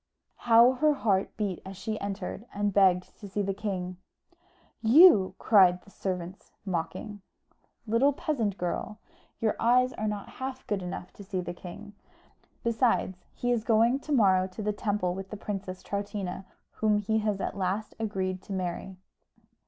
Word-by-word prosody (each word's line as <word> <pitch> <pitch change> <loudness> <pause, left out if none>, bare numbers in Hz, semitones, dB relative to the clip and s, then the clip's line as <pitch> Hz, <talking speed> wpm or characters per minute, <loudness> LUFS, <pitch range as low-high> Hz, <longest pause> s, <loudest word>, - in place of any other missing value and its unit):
How 230 +2 +8
her 295 +3 +2
heart 200 -7 0
beat 200 -5 -2
as 190 0 -9
she 215 +2 -4
entered, 200 +2 -5
and 205 0 0
begged 185 -2 +3
to 205 - -9
see 205 +2 -1
the 195 0 -1
king! 185 -3 -4 0.8
"You!" 225 - +7
cried 180 -4 +5
the 200 - -18
servants 185 -1 -5
mocking. 190 +3 -4 0.6
"Little 235 +6 +3
peasant 235 -9 -2
girl, 180 +4 -3 0.4
your 220 -2 +1
eyes 250 +2 +3
are 215 - -3
not 210 -1 -3
half 260 0 -5
good 205 -3 -2
enough 180 0 -6
to 200 - -11
see 190 -1 -3
the 175 -1 -4
king. 195 +4 -10 0.7
Besides, 225 -6 +1
he 245 - -1
is 235 -3 +1
going 230 +3 +3
to 300 - -8
morrow 190 -8 +4
to 190 +3 -7
the 210 0 0
temple 205 -4 -1
with 190 +1 -7
the 210 - -6
Princess 195 -3 -5
Troutina, 200 -2 -4 0.3
whom 215 -1 +1
he 220 +2 0
has 210 -2 -1
at - - -3
last 195 +3 -2
agreed 190 -4 -2
to 195 - -7
marry." 185 0 -4
205 Hz, 160 wpm, -28 LUFS, 185-220 Hz, 0.8 s, How